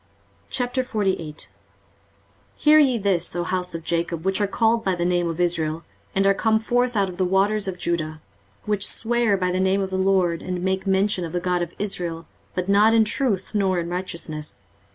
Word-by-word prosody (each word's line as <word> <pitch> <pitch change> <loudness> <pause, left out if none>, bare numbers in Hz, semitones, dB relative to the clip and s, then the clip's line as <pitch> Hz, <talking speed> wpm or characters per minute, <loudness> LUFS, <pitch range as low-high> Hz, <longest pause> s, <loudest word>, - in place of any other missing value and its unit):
23:048:001 215 - -1 1.1
Hear 305 0 +5
ye 265 -5 +4
this, 190 -5 +1
O 175 - -1
house 180 -1 -1
of 165 - -6
Jacob, 170 0 -2
which 190 +2 +1
are 205 - +2
called 225 +3 +1
by 190 -3 0
the 175 0 -2
name 175 -1 +1
of 165 +1 -5
Israel, 165 -2 0 0.3
and 195 0 +2
are 195 - +5
come 220 +2 +2
forth 245 +2 0
out 200 -1 +2
of 180 -1 -8
the 185 - +1
waters 195 +3 +1
of 185 -1 -4
Judah, 155 -3 -2 0.5
which 210 -2 +1
swear 235 -3 +1
by 180 -1 0
the 185 - -1
name 190 +1 +2
of 190 -1 -2
the 190 - -1
LORD, 185 -3 +2
and 180 -1 -4
make 190 +1 -1
mention 190 -1 +2
of 165 - -6
the 175 - 0
God 180 0 0
of 175 -1 -5
Israel, 175 -5 -3 0.3
but 180 0 -2
not 210 +3 +5
in 225 -1 +5
truth, 215 -3 -1
nor 195 -3 +1
in 170 0 -4
righteousness. 165 - -4
190 Hz, 195 wpm, -23 LUFS, 175-210 Hz, 1.1 s, Hear